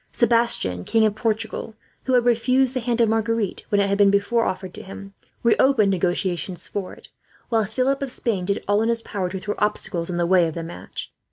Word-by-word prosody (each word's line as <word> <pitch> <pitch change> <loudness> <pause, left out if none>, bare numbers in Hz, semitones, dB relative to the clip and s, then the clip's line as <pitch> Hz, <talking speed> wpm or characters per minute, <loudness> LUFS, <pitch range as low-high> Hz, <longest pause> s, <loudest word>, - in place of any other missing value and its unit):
Sebastian, 230 - +1
King 225 - +3
of 215 - +2
Portugal, 220 0 -3 0.3
who 260 - 0
had 245 -1 +3
refused 250 +2 +2
the 255 - -1
hand 240 0 -1
of 230 - +4
Marguerite 225 -2 -1
when 205 - +2
it 200 - +3
had 200 +1 0
before 200 +4 +2
been - - +2
offered 185 -1 -6
to - - -8
him, 195 +1 -10 0.3
reopened 235 -3 +4
negotiations 180 -1 -1
for 200 -2 -4
it; - - -16 0.4
while 225 -2 +2
Philip 260 +6 0
of 275 - -2
Spain 215 -7 -2
did 200 +1 -1
all 205 +1 +3
in 225 - +1
his 230 -1 0
power 190 -4 -3
to 190 - -5
throw 205 +2 -3
obstacles 185 -5 -1
in 175 - -2
the 175 - +1
way 175 -1 +4
of 160 - -6
the 165 - -4
match. 170 +1 -8
210 Hz, 215 wpm, -23 LUFS, 185-235 Hz, 0.4 s, of